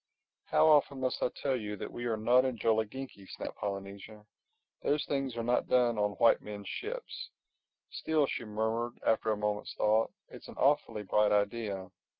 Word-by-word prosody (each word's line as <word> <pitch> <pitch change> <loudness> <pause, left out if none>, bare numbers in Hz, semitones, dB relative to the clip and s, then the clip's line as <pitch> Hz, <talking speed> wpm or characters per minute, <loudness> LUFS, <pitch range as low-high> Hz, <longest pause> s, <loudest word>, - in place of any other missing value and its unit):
"How - - +4
often 145 -3 +4
must 130 -1 -1
I - - +2
tell 135 +1 -2
you 105 -4 -4
that - - -6
we 120 - -5
are 115 -2 0
not 120 +4 +4
in 130 -2 -1
Jolliginki," 110 -1 -1
snapped - - -7
Polynesia. 100 +2 -6 0.6
"Those 145 +1 +1
things 135 -4 -2
are 115 - -1
not 120 +1 +1
done 120 -3 +3
on 105 0 +1
white 115 +2 +4
men's 100 -1 -8
ships—Still," 405 - -4
she 125 - -4
murmured 110 +3 -2
after 110 0 +2
a 105 - 0
moment's 105 0 -2
thought, 110 +1 +2 0.2
"it's - - -12
an - - -10
awfully 140 -7 +2
bright 105 +2 +3
idea. 100 -2 -1
115 Hz, 165 wpm, -31 LUFS, 105-130 Hz, 0.6 s, How